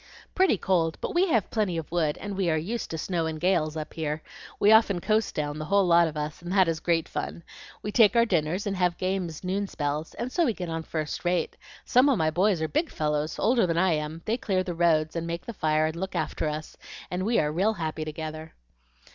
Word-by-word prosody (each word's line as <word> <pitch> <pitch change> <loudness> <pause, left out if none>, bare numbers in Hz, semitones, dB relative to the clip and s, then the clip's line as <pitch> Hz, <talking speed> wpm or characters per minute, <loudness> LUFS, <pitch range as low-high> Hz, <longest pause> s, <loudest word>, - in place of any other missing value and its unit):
"Pretty 370 - +3
cold, 170 -4 +1
but - - -4
we 360 +2 +3
have 230 - +1
plenty 205 -6 0
of 160 -1 -5
wood, 160 -4 0
and 205 -1 -5
we 190 -3 0
are 160 - +2
used 215 +10 -3
to 165 - -4
snow 165 0 -1
and 160 -1 -4
gales 165 -4 +1
up 155 - -6
here. 155 -1 -3 0.4
We 205 - +5
often 220 -4 +5
coast 215 +4 0
down, 150 -2 -2
the 155 - -4
whole 200 +4 +3
lot 170 -1 +5
of 155 -1 -6
us, 150 +2 -4
and 175 +1 -6
that 190 -3 +5
is 165 -1 -1
great 165 -1 +1
fun. 170 - -5 0.4
We 210 - -3
take 215 -2 +5
our 235 0 +5
dinners 175 -1 0
and 200 -1 -1
have 180 -2 +1
games 185 -4 -2
noon 195 +2 -1
spells, 150 -1 -3
and 240 +2 -4
so 345 - +2
we 235 - +1
get 180 -2 -5
on 165 0 -3
first 155 -2 -4
rate; 175 0 0 0.3
some 255 +3 +4
of 265 - +3
my 155 -1 +1
boys 180 0 +2
are - - 0
big 305 - 0
fellows, 150 0 -1
older 230 -2 +3
than 165 -1 0
I 180 0 +3
am; 155 +2 -4
they 225 +2 0
clear 190 -6 0
the 180 - -4
roads 165 -2 +2
and 170 0 -2
make 170 +1 -4
the 235 - -6
fire 155 -4 +1
and 155 +1 -2
look 190 +3 -4
after 155 - -1
us, 155 +1 -6 0.4
and 180 +1 -2
we 230 +4 +1
are 150 -1 +2
real 195 +8 +1
happy 160 -4 -3
together." 155 +1 -6
170 Hz, 240 wpm, -27 LUFS, 155-200 Hz, 0.4 s, We